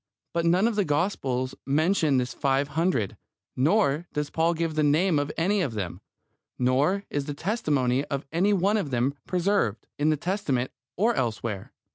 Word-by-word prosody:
But 170 Hz, 0 st, +1 dB
none 180 Hz, +6 st, +4 dB
of 235 Hz, -, -1 dB
the 205 Hz, -, +2 dB
Gospels 140 Hz, -6 st, -1 dB
mentions 155 Hz, 0 st, +2 dB
this 125 Hz, -1 st, -1 dB
five 140 Hz, 0 st, +1 dB
hundred, 160 Hz, -, 0 dB, 0.4 s
nor 160 Hz, +2 st, +2 dB
does 150 Hz, -1 st, -2 dB
Paul 165 Hz, +1 st, +2 dB
give 165 Hz, -1 st, -1 dB
the 155 Hz, -, +1 dB
name 155 Hz, +3 st, +3 dB
of 145 Hz, +1 st, -2 dB
any 190 Hz, +5 st, +2 dB
one 180 Hz, -, +2 dB
of 120 Hz, -, -4 dB
them, 95 Hz, -2 st, -4 dB, 0.6 s
nor 140 Hz, +11 st, +2 dB
is 145 Hz, -1 st, -1 dB
the 145 Hz, -, -4 dB
testimony 145 Hz, -, 0 dB
of 140 Hz, -1 st, -4 dB
any 180 Hz, +6 st, +2 dB
one 200 Hz, +2 st, +2 dB
of 195 Hz, -9 st, -2 dB
them 125 Hz, +2 st, +1 dB
preserved, 180 Hz, -, 0 dB
in 150 Hz, +1 st, +3 dB
the 155 Hz, -, +2 dB
Testament 150 Hz, -8 st, -1 dB, 0.2 s
or 225 Hz, +6 st, +2 dB
elsewhere. 115 Hz, -, -3 dB
150 Hz, 175 wpm, -26 LUFS, 135-185 Hz, 0.6 s, none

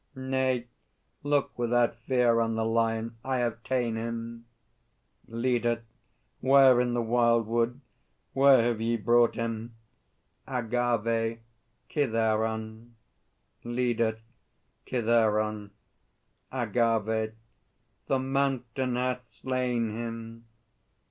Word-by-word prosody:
Nay; 130 Hz, -2 st, -1 dB, 0.6 s
look 145 Hz, -1 st, 0 dB
without 120 Hz, 0 st, +2 dB
fear 120 Hz, 0 st, +2 dB
on 115 Hz, -1 st, 0 dB
The 110 Hz, 0 st, 0 dB
Lion; 115 Hz, 0 st, 0 dB
I 130 Hz, -1 st, -1 dB
have 120 Hz, -2 st, -1 dB
ta'en 120 Hz, -3 st, -1 dB
him! 115 Hz, 0 st, -5 dB, 0.8 s
LEADER. 120 Hz, 0 st, 0 dB, 0.6 s
Where 130 Hz, -2 st, +6 dB
in 120 Hz, -1 st, 0 dB
the 120 Hz, -, 0 dB
wildwood? 115 Hz, +1 st, +1 dB, 0.5 s
Whence 135 Hz, -3 st, +6 dB
have 115 Hz, -2 st, 0 dB
ye 115 Hz, +1 st, +1 dB
brought 120 Hz, +2 st, +3 dB
him? 115 Hz, 0 st, -4 dB, 0.7 s
AGAVE. 115 Hz, -2 st, 0 dB, 0.5 s
Kithaeron.... 110 Hz, -3 st, -1 dB, 0.7 s
LEADER. 120 Hz, -2 st, 0 dB, 0.7 s
Kithaeron? 110 Hz, -3 st, +1 dB, 0.8 s
AGAVE. 110 Hz, -2 st, 0 dB, 0.7 s
The 135 Hz, -, +2 dB
Mountain 130 Hz, -2 st, -1 dB
hath 125 Hz, 0 st, -2 dB
slain 125 Hz, -3 st, -2 dB
him! 115 Hz, 0 st, -7 dB
115 Hz, 90 wpm, -28 LUFS, 115-125 Hz, 0.8 s, Where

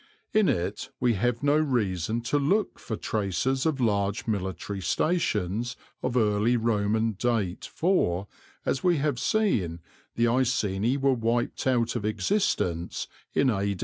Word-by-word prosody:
In 215 Hz, -2 st, +4 dB
it 85 Hz, 0 st, -2 dB
we 120 Hz, -2 st, +3 dB
have 115 Hz, +4 st, 0 dB
no 145 Hz, +1 st, +4 dB
reason 115 Hz, -, 0 dB
to 135 Hz, +5 st, 0 dB
look 195 Hz, +9 st, +1 dB
for 110 Hz, -, -4 dB
traces 110 Hz, -, -1 dB
of 150 Hz, -4 st, 0 dB
large 100 Hz, -3 st, 0 dB
military 100 Hz, -1 st, -3 dB
stations 120 Hz, -, 0 dB, 0.3 s
of 125 Hz, 0 st, -1 dB
early 110 Hz, +1 st, +3 dB
Roman 110 Hz, 0 st, +1 dB
date 105 Hz, -3 st, -1 dB
for, 100 Hz, -, +1 dB, 0.4 s
as 135 Hz, -, 0 dB
we 175 Hz, -3 st, +4 dB
have 140 Hz, -3 st, 0 dB
seen, 105 Hz, -, +1 dB, 0.4 s
the 115 Hz, -, +2 dB
Iceni 115 Hz, -2 st, +1 dB
were 135 Hz, -1 st, +3 dB
wiped 120 Hz, +2 st, -1 dB
out 120 Hz, -2 st, +2 dB
of 120 Hz, -, -2 dB
existence 105 Hz, -, 0 dB, 0.3 s
in 135 Hz, -2 st, +4 dB
A. 100 Hz, -2 st, -1 dB
115 Hz, 140 wpm, -27 LUFS, 100-130 Hz, 0.4 s, In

